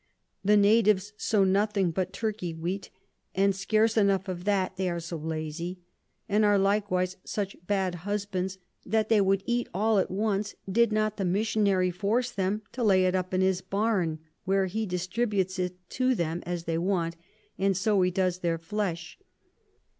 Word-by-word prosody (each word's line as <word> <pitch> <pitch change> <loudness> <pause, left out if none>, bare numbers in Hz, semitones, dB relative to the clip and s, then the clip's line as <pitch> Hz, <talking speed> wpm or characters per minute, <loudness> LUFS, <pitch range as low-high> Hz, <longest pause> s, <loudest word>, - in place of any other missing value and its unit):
The 210 +1 +5
Natives 205 -1 +4
sow 210 -2 +2
nothing 195 -1 +2
but 185 +2 -2
Turky 215 -7 -3
Wheat, 180 +4 -4 0.5
and 195 0 +3
scarce 215 +3 +2
enough 200 -2 +2
of 180 -1 -5
that, 190 -2 +1
they 185 -1 -1
are 170 -1 -2
so 170 +1 -6
lazy: 160 +3 -4 0.5
and 210 0 +2
are 205 -1 +4
likewise 195 -2 +1
such 200 -2 -3
bad 190 -3 +1
Husbands, 195 -1 -2 0.3
that 220 +1 0
they 220 -3 +5
would 195 0 +2
eat 240 0 -1
all 215 +1 +3
at - - 0
once, 205 +1 -1
did 230 +4 +3
not 215 0 0
the 200 - -1
Missionary 195 -1 +2
force 225 +7 0
'em 195 +3 0
to 245 0 -3
lay 190 -4 +4
it 185 - +2
up 185 -1 -1
in 185 0 +1
his 190 -1 +2
Barn, 190 -4 0 0.3
where 195 0 +2
he 215 +4 -2
distributes 185 +1 -1
it 180 0 -1 0.2
to 255 0 +2
'em 170 0 -1
as 175 -1 -3
they 165 -1 -1
want, 170 -2 0 0.4
and 195 -1 +2
so 200 0 +2
he 180 - +3
does 185 0 0
their 170 -2 0
Flesh. 170 -1 -4
195 Hz, 170 wpm, -28 LUFS, 180-210 Hz, 0.5 s, The